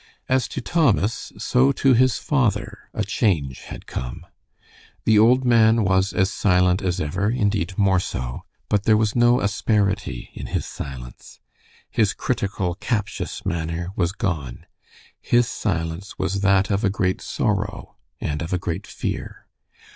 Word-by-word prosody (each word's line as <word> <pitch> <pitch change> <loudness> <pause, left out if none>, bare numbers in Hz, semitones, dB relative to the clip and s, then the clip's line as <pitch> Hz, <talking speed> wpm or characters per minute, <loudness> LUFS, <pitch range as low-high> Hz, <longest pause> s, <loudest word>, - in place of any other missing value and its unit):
As 130 -1 +2
to - - -5
Thomas 125 - +1
so 130 +2 +3
to 135 0 +3
his 125 0 +4
father 110 -6 -1
a 110 - -2
change 85 - 0
had - - -9
come. 60 -1 -6 0.8
The 110 -2 +5
old 125 +4 +5
man 115 -2 +5
was 95 +1 +2
as 95 +1 +1
silent 90 -1 +3
as 90 -1 -1
ever, 90 +6 -1
indeed 100 -6 0
more 95 -2 +3
so, 65 -7 -4 0.3
but 100 -1 0
there 110 -1 +5
was 110 -1 +1
no 120 +1 +4
asperity 100 - 0
in - - -7
his - - -2
silence. 60 -3 -9 0.5
His - - +2
critical, 95 -3 -1
captious 105 +2 -3
manner 85 +1 -2
was 85 0 +1
gone. 85 - -3 0.6
His 120 0 +3
silence 85 -4 -3
was 95 +1 -1
that 100 0 +3
of 100 +2 0
a 100 - +3
great 95 -1 -1
sorrow, 105 0 -2 0.2
and 75 +1 -3
of 85 - -5
a 90 - +2
great 85 -2 -4
fear. - - -5
100 Hz, 145 wpm, -23 LUFS, 90-110 Hz, 0.8 s, The